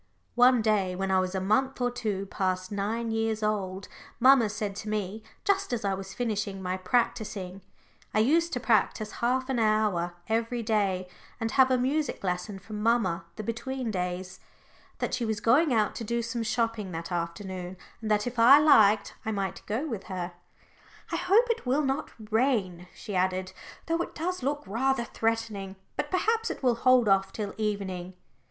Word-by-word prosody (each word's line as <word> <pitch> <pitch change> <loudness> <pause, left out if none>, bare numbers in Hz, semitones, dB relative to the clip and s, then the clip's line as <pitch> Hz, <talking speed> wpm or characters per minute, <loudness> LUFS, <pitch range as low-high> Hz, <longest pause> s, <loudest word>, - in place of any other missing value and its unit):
One 245 -1 +5
day, 200 -4 +1
when 190 +1 -2
I 190 - +4
was 185 +1 -2
a - - +1
month 235 +9 +1
or 245 -1 +1
two 210 -5 -3
past 185 -1 -2
nine 220 +3 -2
years 225 -1 -1
old, 195 -3 -2 0.3
mamma 255 -3 +6
said 205 -1 -3
to 215 - -5
me 210 0 -3 0.2
just 395 -4 +1
as 230 -4 -2
I 195 - +1
was 195 0 -6
finishing 210 -5 -2
my 185 -1 -2
practising 195 -2 -1 0.5
I - - -1
used 325 +10 +3
to 245 - 0
practise 215 -2 +1
half 255 +2 +1
an 265 -3 0
hour 210 -6 +1
every 230 +2 0
other - - -8
day, 195 -4 +1 0.3
and 225 -1 -2
have 265 +1 +5
a 255 - +3
music 275 +2 -1
lesson 180 +2 -2
from 210 +2 -7
mamma 210 -7 +1
the 215 - -5
between 240 +2 -3
days 180 0 -4 0.6
that - - -2
she 250 - 0
was 220 -2 -1
going 270 +8 +4
out 215 -4 +2
to 235 - -4
do 235 +2 -1
some 235 0 -3
shopping 225 -3 -1
that 165 +2 -5
afternoon, 180 +1 -4 0.2
and 220 - -4
that, 210 -1 +2
if 245 -1 -4
I 250 +5 +9
liked, 220 -9 +5
I 220 - -2
might 195 -2 -3
go 230 +9 -1
with 225 -9 -5
her. 180 -2 -4 0.8
"I - - 0
hope 420 +6 +4
it 465 - -4
will 275 +4 +2
not 270 0 -1 0.2
rain," 210 -8 +1
she 205 -4 -6
added, 185 +1 0 0.3
"though 330 +1 0
it - - -5
does 360 +2 -2
look 285 +3 -1
rather 240 +5 0
threatening. 220 -4 -2 0.2
But 295 - -2
perhaps 450 +6 +1
it - - -6
will 250 -2 +4
hold 250 0 +4
off 195 -1 +3
till 205 -1 -4
evening." 190 -4 -3
215 Hz, 185 wpm, -28 LUFS, 190-245 Hz, 0.8 s, I